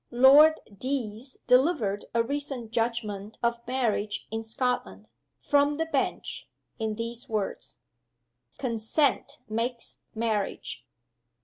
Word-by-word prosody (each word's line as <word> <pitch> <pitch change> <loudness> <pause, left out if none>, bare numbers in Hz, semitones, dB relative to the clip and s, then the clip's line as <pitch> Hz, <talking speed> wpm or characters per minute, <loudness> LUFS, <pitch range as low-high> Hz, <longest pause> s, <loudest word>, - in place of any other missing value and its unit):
Lord 280 +6 +7 0.2
Deas 255 +1 -4
delivered 250 - +3
a 230 - +4
recent 270 -3 -4
judgment 225 -3 -2
of 235 0 +1
marriage 230 -5 -1
in 225 0 -2
Scotland, 225 - -2 0.4
from 290 0 +3
the 325 - 0
bench, 325 - -2 0.3
in 220 -1 -1
these 230 +1 -6
words: 215 -3 -3 0.8
'Consent 265 +4 0
makes 230 +2 -3 0.2
marriage. 215 - -2
235 Hz, 100 wpm, -28 LUFS, 220-265 Hz, 0.8 s, Lord